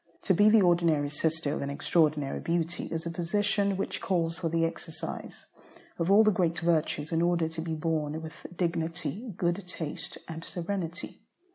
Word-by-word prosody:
To 190 - +3
be 205 +4 +6
the 215 -2 +6
ordinary 165 -5 +3
sister 160 -1 +1
of - - -3
an 140 - -2
extraordinary 150 -1 +1
beauty, 170 0 -1
is 165 0 -4
a 170 - -2
position 200 +3 +1
which 195 - -2
calls 170 -3 0
for 170 -3 -1
the 165 0 +2
exercise 165 0 -6 0.5
of 170 +1 0
all 205 +3 +7
the 215 - +5
great 170 -3 +1
virtues 160 -2 +1
in 165 0 +2
order 170 -1 +2
to 160 0 -5
be 160 -1 -3
borne 155 -1 -1
with 160 -1 -8 0.2
dignity, 175 +6 -2
good 175 +3 0
taste, 160 -4 -6
and 165 0 -6
serenity. 175 0 -4
165 Hz, 170 wpm, -29 LUFS, 160-180 Hz, 0.5 s, all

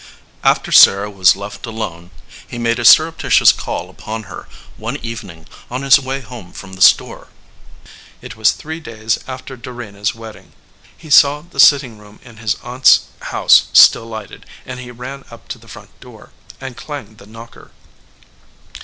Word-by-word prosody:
After - - +1
Sarah 100 +2 +6
was 95 -2 +3
left 100 +4 -9
alone 90 -7 -7 0.4
he 120 - -9
made 115 0 -1
a - - -3
surrepti 160 +7 +4
tious - - +5
call - - -6
upon 110 0 -8
her 100 - -11 0.3
one 115 +6 -6
evening 95 -8 -9 0.2
on 125 +2 -5
his 140 +1 +5
way 135 0 -5
home 115 -7 -12
from 95 -1 -11
the 95 - -11
store. - - +3 0.9
It - - -11
was 110 -1 +2
three 160 +2 -8
days 115 -6 -4
after 130 0 -9
Dorena 120 -4 -11
s 105 - -1
wedding. 115 -1 -13 0.4
He 155 -3 -14
saw; 145 +1 +5
the 155 -3 -14
sitting 135 -5 +4
room 105 0 -18
in 120 -2 -16
his 110 -1 -2
aunt 125 +2 -10
s - - +8 0.3
house - - +4
still 115 - +6
lighted, 110 -3 -10 0.2
and 125 0 -8
he 125 -1 -10
ran 125 +3 -9
up 115 - -15
to - - -7
the - - -20
front - - -14
door - - -16 0.3
and 130 -2 -9
clanged 120 -7 -10
the 100 - -16
knocker. 115 +2 -14
115 Hz, 170 wpm, -16 LUFS, 105-130 Hz, 0.9 s, s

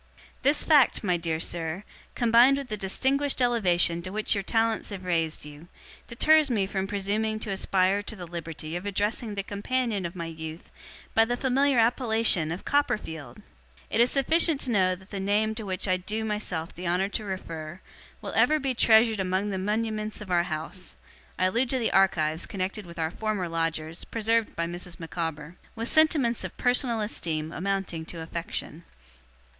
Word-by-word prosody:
This 285 +3 +2
fact, 295 -8 +4
my 180 -3 +2
dear 165 -2 -2
sir, 170 +2 -2 0.3
combined 240 +3 +5
with 275 -2 -6
the 215 - -2
distinguished 265 +9 0
elevation 180 -9 +2
to 185 - -6
which 215 +1 0
your 200 - 0
talents 225 +2 0
have 190 -3 -7
raised 165 -4 -1
you, 150 +3 -12 0.4
deters 310 +5 +4
me 210 -6 +1
from 190 0 -3
presuming 210 +2 -1
to 210 - -3
aspire 190 +1 +1
to 210 +2 -7
the 180 -3 -8
liberty 165 -1 -6
of 180 +3 -4
addressing 205 +2 -1
the 200 - -2
companion 210 +1 -2
of 170 - -11
my 170 -2 -4
youth, 160 0 -8 0.4
by 225 - +5
the 240 +2 -1
familiar 270 +1 +2
appellation 225 - +2
of 175 - -6
Copperfield! 160 - -1 0.5
It 225 - +3
is 240 - +5
sufficient 310 +3 +3
to 255 - -1
know 185 -4 +3
that 190 +2 -18
the 200 - -4
name 210 +3 +1
to 220 -2 -7
which 185 +1 -2
I 185 -1 +2
do 215 +4 -3
myself 195 -6 -3
the 180 +1 -6
honour 180 +3 +1
to 215 - -4
refer, 170 -4 -6 0.4
will - - -5
ever 310 - +4
be 270 -3 -1
treasured 225 -2 +4
among 190 +2 0
the 190 - -2
muniments 215 +1 -2
of 205 -3 -8
our 175 -1 +3
house 160 +4 -5 0.4
(I 185 - +2
allude 235 +7 +1
to 265 - +1
the 235 -3 0
archives 165 -4 +2
connected 195 +1 -4
with 170 - -11
our 160 -1 -1
former 210 -3 -2
lodgers, 165 -1 -3
preserved 225 0 0
by 170 - -1
Mrs. 175 +1 -7
Micawber), 165 -1 -5 0.2
with 230 +1 -1
sentiments 300 -7 +4
of - - -7
personal 245 -2 +2
esteem 160 -7 -2
amounting 195 -3 -2
to 165 0 -7
affection. 165 0 -5
195 Hz, 180 wpm, -27 LUFS, 170-230 Hz, 0.5 s, combined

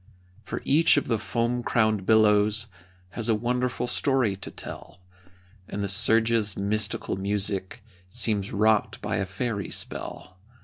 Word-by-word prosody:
For - - -6
each 155 +2 +5
of 145 - 0
the 115 -3 0
foam 120 +2 -1
crowned 110 -5 +1
billows 110 0 +4 0.4
Has 115 +4 -3
a 110 - +4
wonderful 125 +2 -1
story 125 -5 +1
to 95 - -8
tell, 85 - -9 0.7
And 100 - -4
the - - -1
surge's 110 +1 +2
mystical 105 0 -1
music 100 +1 -2 0.3
Seems 100 +1 +1
wrought 110 +1 +2
by - - -1
a 95 0 -2
fairy 100 0 -3
spell. 90 0 -5
110 Hz, 135 wpm, -26 LUFS, 100-115 Hz, 0.7 s, each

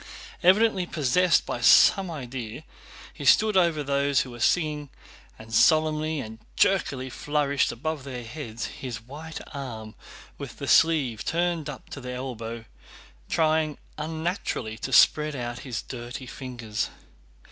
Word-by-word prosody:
Evidently 190 0 +4
possessed 170 +4 +2
by - - -4
some 195 -3 +6
idea, 125 -4 -6 0.5
he - - -9
stood 215 -1 +5
over 170 -5 +3
those 140 0 +2
who 130 - -6
were 120 - -10
singing, 150 +2 +1 0.5
and 110 0 -12
solemnly 155 +2 +3
and 110 -3 -7 0.2
jerkily 140 -9 +1
flourished 140 +1 0
above 155 +3 -4
their 125 -3 -6
heads 115 -2 -6
his 125 -3 -6
white 150 +7 -9
arm 115 -6 -6 0.5
with - - -8
the - - -6
sleeve 145 -9 +3
turned 170 -3 -1
up 135 - -9
to 135 - -7
the 125 0 -6
elbow, 115 -3 -6 0.6
trying 155 -1 +1 0.2
unnaturally 160 - -3
to 110 - -6
spread 150 -1 +5
out 120 -1 -4
his 125 -4 -5
dirty 125 +1 -7
fingers. 120 -5 -4
140 Hz, 135 wpm, -26 LUFS, 120-160 Hz, 0.6 s, some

